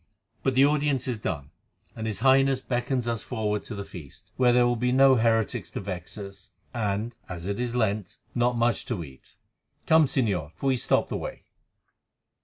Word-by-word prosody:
"But 130 +3 0
the 135 +2 +7
audience 145 -3 +1
is 120 -4 -2
done, 75 -9 -4 0.4
and 110 0 -4
his 105 -2 -4
Highness 135 0 +4
beckons 125 -1 -1
us 115 -2 -1
forward 105 -4 -2
to 115 - -6
the 100 0 -5
feast, 80 -8 -12
where 125 -1 +4
there 120 0 +5
will 120 0 +2
be 125 +1 0
no 135 +1 +6
heretics 115 -2 +1
to - - -3
vex 95 -1 -6
us, 100 0 -9 0.2
and, 110 0 -2
as 85 -2 -6
it 100 +3 -2
is 120 -1 -2
Lent, 105 -5 -1 0.2
not 120 0 +1
much 120 0 +1
to 105 -9 -2
eat. 65 -4 -15 0.5
Come, 160 -1 +6
Señor! 100 - 0
for - - -7
we 130 - +2
stop - - +1
the - - -2
way." - - -6
115 Hz, 190 wpm, -27 LUFS, 100-125 Hz, 0.5 s, the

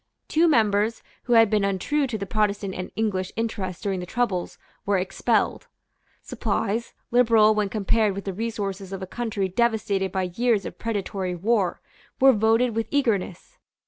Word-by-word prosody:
Two 330 +2 +3
members, 220 -5 +2 0.2
who 245 - +1
had 225 -1 +7
been 210 -1 +1
untrue 200 +10 0
to 235 -3 -3
the 200 - -4
Protestant 205 -1 -1
and 185 0 -5
English 195 -4 -1
interest 205 -6 -3
during 195 -2 -1
the 180 - -6
troubles, 200 -5 -2 0.3
were 200 -1 +1
expelled. 185 +1 0 0.6
Supplies, 220 +1 -2 0.2
liberal 225 -3 +5
when 210 -2 0
compared 215 0 +1
with 200 - -6
the 195 - -3
resources 200 -3 -4
of 190 -1 -5
a - - -3
country 215 -2 -2
devastated 200 -2 0
by 190 -1 -1
years 230 -1 +1
of - - -8
predatory 195 -4 -3
war, 200 +1 0 0.4
were 270 0 +7
voted 225 +2 +2
with 225 0 -1
eagerness. 215 -10 -1
210 Hz, 160 wpm, -24 LUFS, 195-230 Hz, 0.6 s, had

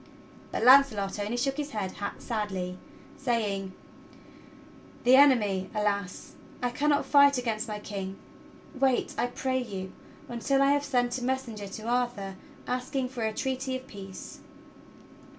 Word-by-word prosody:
But - - -2
Launcelot 245 -7 +6
only 210 +4 -2
shook 270 +3 0
his 295 -1 -3
head 200 -3 -3 0.2
sadly, 190 -5 -3 0.4
saying: 215 -8 -1 1.3
"The 250 +1 +7
enemy! 210 -9 +4
Alas! 200 -3 -2 0.3
I 245 -3 -1
cannot 290 +3 +1
fight 280 -1 +6
against 225 -3 -2
my 210 -1 -4
King. 195 -2 -6 0.6
Wait, 265 -2 +1
I - - 0
pray 260 +1 -1
you, 195 -5 -6 0.3
until 270 +3 +1
I 275 - +4
have 285 0 +2
sent 245 -2 +1
a - - -6
messenger 245 -5 -2
to 205 +3 -8
Arthur 240 -5 -1 0.3
asking 255 +1 -2
for 250 -2 -6
a 220 -1 +1
treaty 260 +3 -2
of 260 - -13
peace." 195 -7 -9
240 Hz, 135 wpm, -28 LUFS, 205-265 Hz, 1.3 s, The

